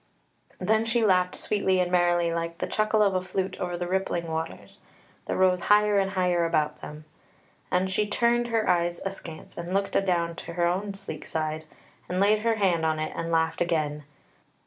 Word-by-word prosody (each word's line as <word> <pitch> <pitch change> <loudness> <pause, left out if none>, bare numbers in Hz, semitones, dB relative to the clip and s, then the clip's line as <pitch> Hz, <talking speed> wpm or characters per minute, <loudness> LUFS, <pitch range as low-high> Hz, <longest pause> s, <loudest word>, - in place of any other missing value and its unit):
Then 220 +1 +2
she 225 0 +1
laughed 180 -2 +3
sweetly 190 -3 +1
and 180 -1 0
merrily 175 -1 +2
like 170 0 -3
the - - -2
chuckle 215 0 +2
of 200 -2 +2
a 185 - +1
flute 185 0 -3
over 175 -1 -3
the 175 - -3
rippling 185 -2 -1
waters, 160 0 -5 0.5
that - - -2
rose 185 -1 +3
higher 210 0 +5
and 195 0 +1
higher 180 -3 +1
about 155 -2 0
them, 150 +1 -9 0.6
and 180 +1 +1
she 210 +3 0
turned 240 +3 +2
her 225 -2 0
eyes 175 0 +1
askance 175 -5 -7
and 175 +2 -4
looked 195 0 -1
adown 170 -3 +1
to - - -7
her 175 0 +1
own 195 +3 -1
sleek 195 -6 -8
side, 155 0 -3 0.4
and 180 +1 -1
laid 210 +2 +4
her 225 +1 +1
hand 185 -6 +1
on 160 -1 +1
it 155 0 -3
and 165 0 -3
laughed 160 0 +1
again. 155 -3 0
180 Hz, 190 wpm, -26 LUFS, 170-200 Hz, 0.6 s, higher